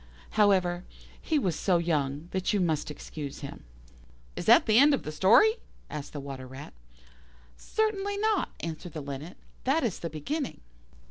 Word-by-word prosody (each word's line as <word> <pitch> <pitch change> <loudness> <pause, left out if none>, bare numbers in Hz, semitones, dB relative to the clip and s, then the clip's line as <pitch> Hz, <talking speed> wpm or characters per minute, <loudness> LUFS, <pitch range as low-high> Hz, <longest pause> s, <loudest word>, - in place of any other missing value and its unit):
However, 185 -4 +3 0.4
he 315 - +1
was 185 - 0
so 185 -3 +2
young 150 -2 -1
that 190 +1 0
you 205 - +2
must 160 -5 0
excuse 150 -1 -7
him." 140 - -8 0.7
"Is - - -5
that - - +7
the 220 +1 +5
end 285 +1 +7
of - - -7
the 155 - -5
story?" 235 - +5 0.3
asked 150 -1 -6
the 145 - -4
Water 135 -2 -7
rat. 130 +3 -10 0.8
"Certainly 405 - -1
not," 430 -1 +1
answered 165 0 -6
the 155 - -5
Linnet, 140 +5 -7 0.3
"that 275 +5 +2
is 225 -7 -1
the 170 - -4
beginning." 260 - -4
175 Hz, 160 wpm, -28 LUFS, -, 0.8 s, that